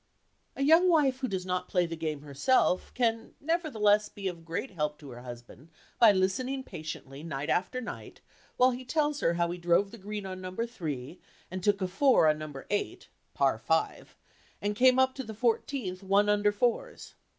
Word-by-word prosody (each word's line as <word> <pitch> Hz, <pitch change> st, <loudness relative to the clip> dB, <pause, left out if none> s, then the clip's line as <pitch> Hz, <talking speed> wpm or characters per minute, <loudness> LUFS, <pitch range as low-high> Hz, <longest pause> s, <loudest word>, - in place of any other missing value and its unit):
A 275 Hz, -, -1 dB
young 325 Hz, +5 st, +6 dB
wife 280 Hz, -6 st, +3 dB
who 260 Hz, -, -1 dB
does 190 Hz, -4 st, -3 dB
not 180 Hz, 0 st, -2 dB
play 180 Hz, -1 st, +1 dB
the 165 Hz, 0 st, -5 dB
game 155 Hz, -3 st, -3 dB
herself 150 Hz, -, +1 dB
can, 230 Hz, -2 st, 0 dB
nevertheless, 230 Hz, -11 st, +2 dB
be 200 Hz, -1 st, -6 dB
of 170 Hz, -3 st, -5 dB
great 165 Hz, +10 st, -4 dB
help 150 Hz, -4 st, -2 dB
to 145 Hz, -3 st, -11 dB
her 120 Hz, 0 st, -10 dB
husband 125 Hz, +4 st, -11 dB, 0.3 s
by 225 Hz, -3 st, +8 dB
listening 230 Hz, +8 st, 0 dB
patiently, 155 Hz, -, -8 dB
night 150 Hz, -2 st, -3 dB
after 195 Hz, +8 st, 0 dB
night, 250 Hz, -, -8 dB, 0.4 s
while 255 Hz, +1 st, +5 dB
he 250 Hz, +1 st, -6 dB
tells 295 Hz, +2 st, 0 dB
her 170 Hz, -, +1 dB
how 170 Hz, 0 st, 0 dB
he 180 Hz, -, -6 dB
drove 175 Hz, +3 st, +2 dB
the 230 Hz, -, -11 dB
green 205 Hz, +1 st, -5 dB
on 185 Hz, -1 st, -6 dB
number 185 Hz, +5 st, -3 dB
three, 160 Hz, -, -6 dB, 0.3 s
and 185 Hz, -1 st, -5 dB
took 205 Hz, -1 st, +2 dB
a -, -, 0 dB
four 220 Hz, -, +4 dB
on 155 Hz, 0 st, +2 dB
number 150 Hz, -3 st, -8 dB
eight 205 Hz, -, -2 dB, 0.3 s
(Par -, -, +2 dB
five), -, -, -1 dB, 0.4 s
and 205 Hz, 0 st, -2 dB
came 255 Hz, +2 st, +5 dB
up 260 Hz, 0 st, +3 dB
to 265 Hz, -, -5 dB
the 220 Hz, -3 st, -8 dB
fourteenth 225 Hz, -4 st, -1 dB
one 200 Hz, +2 st, +3 dB
under 205 Hz, 0 st, +3 dB
fours. 245 Hz, -, -2 dB
200 Hz, 190 wpm, -29 LUFS, 170-250 Hz, 0.4 s, by